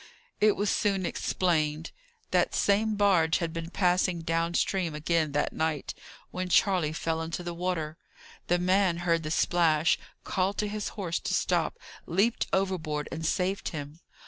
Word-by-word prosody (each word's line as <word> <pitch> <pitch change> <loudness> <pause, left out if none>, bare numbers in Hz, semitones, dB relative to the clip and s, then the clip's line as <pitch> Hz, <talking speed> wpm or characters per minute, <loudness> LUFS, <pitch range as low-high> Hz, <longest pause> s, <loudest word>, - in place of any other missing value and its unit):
It 210 -1 +4
was 205 0 0
soon 195 -4 +1
explained. 160 -4 0 0.4
That - - +2
same 210 +2 +2
barge 185 -6 +3
had 165 -2 -3
been 165 0 -5
passing 180 -1 +1
down 165 +1 -1
stream 175 -5 0
again 155 0 0
that 150 - 0
night, 160 -2 -2 0.4
when 185 0 -3
Charley 180 -4 +3
fell 160 0 -2
into 165 +2 -4
the 175 0 -4
water. 170 -3 -3 0.5
The 175 - +3
man 185 0 +2
heard 165 -1 +2
the 155 - -4
splash, 160 -1 +2 0.2
called 190 +1 -1
to 210 - 0
his 210 0 -3
horse 175 -5 -2
to - - -1
stop, - - 0 0.3
leaped 200 +7 +1
overboard, 175 -6 -1
and 160 0 -5
saved 185 +4 0
him. 150 -1 -7
175 Hz, 155 wpm, -28 LUFS, 160-190 Hz, 0.5 s, It